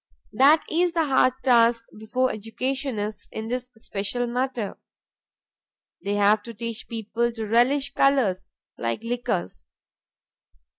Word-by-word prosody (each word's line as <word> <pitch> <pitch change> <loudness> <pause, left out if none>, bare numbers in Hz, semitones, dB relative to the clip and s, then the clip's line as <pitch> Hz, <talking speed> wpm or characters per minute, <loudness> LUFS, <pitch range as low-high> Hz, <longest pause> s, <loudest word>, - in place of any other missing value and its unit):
That 290 +4 +5
is 345 +1 +1
the 330 -2 +2
hard 260 -2 +3
task 235 -2 +4
before 255 +4 0
educationists 225 0 -3
in 220 +1 -5
this 250 +1 -3
special 225 +3 -2
matter; 245 -3 -3 1.2
they 200 +1 -1
have 205 +1 +4
to 230 +2 -10
teach 230 +1 -5
people 230 +1 -2
to 225 -1 -4
relish 250 +6 +2
colors 240 -10 +2 0.3
like 115 - -2
liquors. 230 - -3
235 Hz, 115 wpm, -25 LUFS, 215-260 Hz, 1.2 s, That